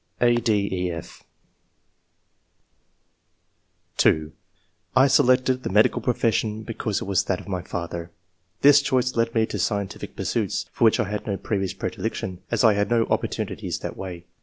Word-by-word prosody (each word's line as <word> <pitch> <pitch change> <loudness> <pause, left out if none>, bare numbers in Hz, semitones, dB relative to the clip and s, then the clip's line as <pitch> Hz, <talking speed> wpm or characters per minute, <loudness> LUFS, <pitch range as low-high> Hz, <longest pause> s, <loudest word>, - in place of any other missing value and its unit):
(a, 120 0 +4
d, 100 -5 0
e^f) 85 -2 -8 2.8
(2) 80 0 +2 0.6
I 130 +1 +7
selected 130 -1 +3
the - - -4
medical 105 +3 +3
profession 110 -3 0
because 110 -2 -3
it - - -2
was 95 -2 0
that 90 - -1
of - - -12
my 95 -3 -2
father. 85 -1 -5 0.5
This 145 0 +7
choice 130 -3 0
led 115 0 0
me 110 -1 +3
to 105 - -5
scientific 100 +1 -3
pursuits, - - -1
for - - +2
which 110 - +4
I 110 - +1
had 105 +1 -4
no 100 -2 -1
previous 95 -1 -2
predilection, 95 -1 -4
as - - +1
I 110 -2 +6
had 100 0 0
no 115 -1 +3
opportunities - - -2
that - - -5
way. 90 -2 -7
105 Hz, 155 wpm, -24 LUFS, 95-120 Hz, 2.8 s, I